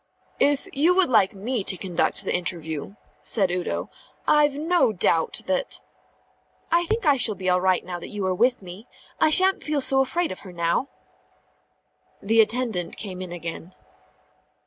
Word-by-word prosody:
"If 285 -1 +2
you 320 +6 +3
would 370 -7 +3
like 200 -4 +3
me 220 +2 -2
to 190 - +1
conduct 180 -3 -1
the - - -1
interview," 170 0 -3 0.3
said 195 -5 +2
Udo, 180 0 -3 0.4
"I've 295 -2 +4
no 325 -3 +2
doubt 165 -4 0
that 185 -1 -2 0.5
" - - -39
"I 340 +1 +2
think 445 0 -1
I 290 -2 +4
shall 225 -4 +2
be 185 0 -5
all 180 0 +2
right 185 -1 +1
now 175 -1 -5
that - - -8
you 205 -2 -4
are 185 - +1
with 240 +3 +1
me. 185 +6 -10 0.3
I - - +4
shan't 375 +5 +3
feel 300 -1 -1
so 270 0 +3
afraid 335 +6 0
of 185 - -7
her 190 - -11
now." 170 +9 0 1.3
The 225 +3 +4
attendant 220 -6 -2
came 185 -3 -6
in 185 -2 -7
again. 170 +1 -7
205 Hz, 170 wpm, -24 LUFS, 180-280 Hz, 1.3 s, I've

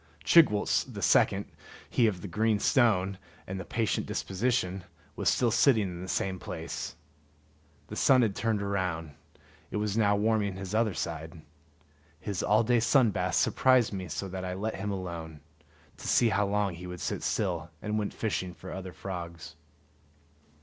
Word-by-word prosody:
Chigwooltz 150 -12 +5
the - - -6
second, - - +3 0.4
he 120 - +3
of 95 -5 -2
the - - -4
green 110 +4 +1
stone 100 -4 +2 0.3
and 95 0 -5
the - - -4
patient 115 +2 -1
disposition, 95 -3 -1 0.3
was - - +1
still 120 -2 +2
sitting 115 -2 +4
in 90 -2 -5
the 95 - -6
same 95 0 -1
place. - - -6 0.9
The - - -8
sun 130 -2 +5
had 105 -4 0
turned 110 -3 0
round; 90 -6 -2 0.6
it - - -3
was 105 -1 -1
now 105 -2 +3
warming 105 -2 +1
his 95 0 -6
other 110 -4 +1
side. 80 0 -5 0.8
His 100 +1 -3
all 105 +3 +3
day 120 +1 +3
sun 115 0 +4
bath - - -1
surprised 130 -4 +3
me 95 -2 -4
so 95 +5 -4
that 95 0 -5
I 90 0 -3
let 110 +4 -2
him 105 - -4
alone, 85 -5 -5 0.6
to - - -8
see 120 - +4
how 100 -1 +1
long 100 -2 0
he 90 +2 -8
would 90 0 -7
sit - - -3
still, 85 -5 -1
and 105 +4 -2
went 105 - -2
fishing 95 -5 -2
for 95 - -9
other 95 -1 -6
frogs. 85 -2 -7
100 Hz, 170 wpm, -29 LUFS, 90-110 Hz, 0.9 s, Chigwooltz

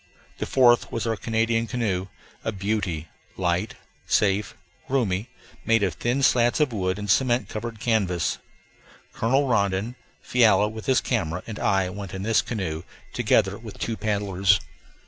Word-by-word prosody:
The - - -2
fourth 120 -3 +4
was 115 -1 -2
our 115 -1 0
Canadian 115 +1 0
canoe, 100 -7 -1 0.4
a - - -1
beauty; 100 -5 -2 0.3
light, 90 +3 0 0.3
safe, 100 0 +1 0.3
roomy, 115 -5 0 0.3
made 115 -1 +3
of 95 -4 +1
thin 120 - -1
slats 120 0 +3
of 150 -5 +2
wood 95 -2 -1
and 105 0 -5
cement 120 +4 +2
covered 115 0 -5
canvas. 100 -8 0 0.7
Colonel 135 +5 +1
Rondon, 100 0 0 0.3
Fiala 105 -4 +4
with 110 0 -8
his 130 -2 +3
camera, 90 -7 -2
and 110 -2 -7
I 95 -2 +1
went 100 -1 -7
in 95 - -4
this 110 +1 +3
canoe, 90 -9 -3 0.3
together - - +2
with - - -10
two 115 - -2
paddlers. 100 -3 +2
105 Hz, 145 wpm, -25 LUFS, 95-115 Hz, 0.7 s, fourth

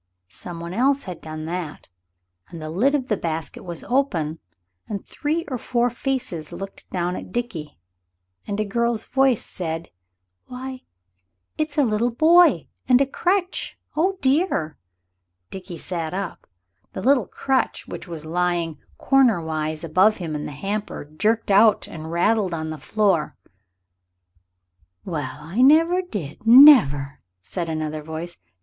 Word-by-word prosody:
Some 170 - -8
one 170 +1 -6
else 270 +6 +2
had 180 -4 -8
done 155 0 -7
that, 170 -2 -5 0.6
and 170 - -9
the 155 0 -6
lid 255 - +2
of 260 -3 -2
the 215 - +1
basket 165 -3 -4
was 170 -2 -6
open, 170 - 0 0.5
and 200 -2 -5
three 320 +3 -2
or 255 -4 -4
four 240 +1 0
faces 240 - -3
looked 195 0 -8
down 180 0 -2
at - - -8
Dickie, 190 -10 -4 0.7
and 200 - -3
a 215 - +1
girl's 235 +1 0
voice 265 -4 +2
said 165 -1 -5 0.6
"Why, 255 +1 -7 0.7
it's 310 -1 -3
a 290 - +5
little 230 0 +1
boy! 315 - +5 0.2
And 250 0 +6
a 275 - +4
crutch 360 +6 -1 0.2
oh, 375 +5 +1
dear!" 265 - +1 0.8
Dickie 185 -2 -7
sat 170 0 -4
up. 195 -2 -5 0.5
The 190 - -5
little 270 +1 +3
crutch, 265 -1 -1
which - - -8
was 165 -3 -7
lying 170 -1 -1 0.2
corner 260 -8 +4
wise 155 -1 -3
above 185 +7 +3
him 165 -4 -5
in 150 - -4
the - - -7
hamper, 200 +5 -4
jerked 210 +9 0
out 210 +1 +5
and 160 0 -8
rattled 185 +1 +1
on 160 -1 -4
the 155 - -7
floor. 190 0 +1 1.7
"Well, 145 -7 -4
I 170 +11 -2
never 330 +7 +5
did 195 - -7
never!" 225 - +7 0.2
said 170 - -4
another 155 -1 -3
voice. 160 +3 -7
195 Hz, 145 wpm, -23 LUFS, 160-255 Hz, 1.7 s, never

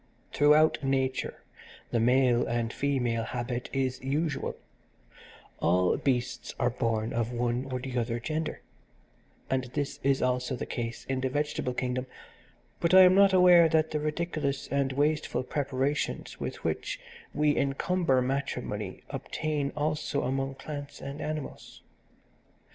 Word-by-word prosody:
"Throughout 150 +1 +4
nature 130 -1 -1 0.5
the 120 - +2
male 125 +1 +3
and 120 -1 -1
female 125 -5 0
habit 120 +1 -4
is 130 -2 -1
usual: 145 +3 -1 1.0
all 90 +2 +3
beasts 125 -2 -1
are 120 0 +2
born 115 -2 -1
of 115 0 -1
one 120 +1 -1
or 130 - -1
the 130 0 -6
other 115 0 -1
gender, 155 +6 -3 0.9
and 130 -1 0
this 145 -2 -2
is 135 -1 +2
also 125 +1 0
the - - -4
case 115 -1 -4
in 130 -1 -2
the 130 - 0
vegetable 145 -2 -2
kingdom: 125 0 -2 0.7
but 170 +2 +3
I 190 - +11
am 180 0 +7
not 195 0 +6
aware 180 -3 +7
that 160 0 +2
the 155 - 0
ridiculous 150 -2 -2
and 140 0 +1
wasteful 145 -2 0
preparations 140 +1 -2
with - - -5
which - - -2 0.3
we 150 -1 +2
encumber 140 0 +1
matrimony 125 -7 -3
obtain 150 -3 -2
also 150 +1 -1
among 135 +1 -1
plants 145 +1 -7
and 140 +2 -6
animals. 155 -2 -6
135 Hz, 135 wpm, -29 LUFS, 125-150 Hz, 1.0 s, I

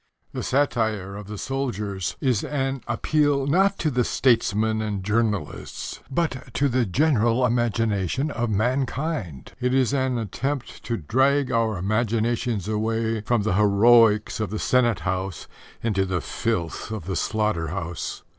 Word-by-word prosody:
The - - -3
satire 110 -8 0
of 105 -1 -8
the 105 0 -6
soldiers 105 -8 -3
is 125 -6 +1
an 135 -2 -2
appeal 145 -3 +1
not 190 +7 +3
to 155 - 0
the 125 -1 +2
statesmen 110 -3 +2
and 105 -3 -3
journalists, 105 -4 -2
but 130 -5 -2
to 140 +4 +2
the 125 -3 +1
general 125 - +2
imagination 115 - 0
of 120 -3 -2
mankind. 120 - -2
It 125 0 +1
is 135 0 +2
an 130 -2 +1
attempt 125 +5 -4
to 115 - -1
drag 135 - +2
our 115 -3 +1
imaginations 110 +1 0
away 110 +1 -1
from 110 0 +1
the 105 - 0
heroics 105 +2 +4
of 110 -3 -1
the 110 - -3
senate 120 -5 +2
house 95 +1 -3 0.4
into 100 -4 +1
the 95 -1 0
filth 90 -6 -3
of 110 -6 -5
the 95 0 -3
slaughter 105 -7 0
house. 85 0 -5
115 Hz, 145 wpm, -24 LUFS, 105-130 Hz, 0.4 s, heroics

